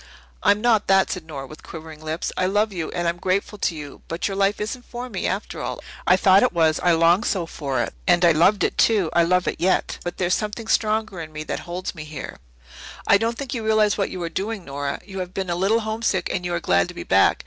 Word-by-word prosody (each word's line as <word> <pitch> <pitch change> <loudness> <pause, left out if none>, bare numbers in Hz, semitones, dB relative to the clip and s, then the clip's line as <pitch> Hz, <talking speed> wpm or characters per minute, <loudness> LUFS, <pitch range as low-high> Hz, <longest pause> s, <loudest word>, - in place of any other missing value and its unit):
"I'm 205 +1 +3
not 225 -3 +3
that," 195 0 +4
said 175 -4 -5
Nora 140 -4 -6
with 155 +3 -12
quivering 160 -1 -10
lips. 155 +2 -3
"I 185 - +1
love 205 +2 +1
you, 165 -4 -3
and 175 0 -2
I'm 170 +1 0
grateful 195 +3 -1
to 170 - 0
you. 145 -2 -9
But 165 +1 -2
your 195 - -3
life 195 +1 +1
isn't 235 +4 -4
for 245 +1 -7
me, - - -2
after - - -3
all. - - -4 0.3
I 180 - +6
thought 190 +1 +6
it 250 - +2
was 160 -2 +3
I 175 -1 +3
longed 170 +6 +4
so 180 -4 0
for 140 -6 -2
it. - - -5
And 175 0 +5
I 170 - +7
loved 175 +6 +4
it, - - -1
too 205 -8 +3
I 170 - +5
love 180 +2 +2
it - - -1
yet. 185 +2 +1
But 175 - -5
there's 185 -1 +1
something 215 +1 -2
stronger 215 -4 0
in 155 -1 -8
me 155 0 -6
that - - -4
holds 180 +1 -4
me 155 - -8
here." 155 0 -8 0.7
"I 200 - +5
don't 230 +1 -1
think 275 -3 -5
you 235 -3 -3
realize 215 -1 +3
what 200 - -1
you 185 - -6
are - - -1
doing, 200 +2 -4
Nora. 140 0 -3
You 195 -2 -7
have 180 0 -5
been 190 -2 -2
a - - 0
little 200 +6 +2
homesick 220 -4 -1
and 180 -1 -2
you 175 -1 -1
are - - 0
glad 90 - +2
to - - -10
be - - -6
back. - - +4
185 Hz, 260 wpm, -23 LUFS, 165-210 Hz, 0.7 s, I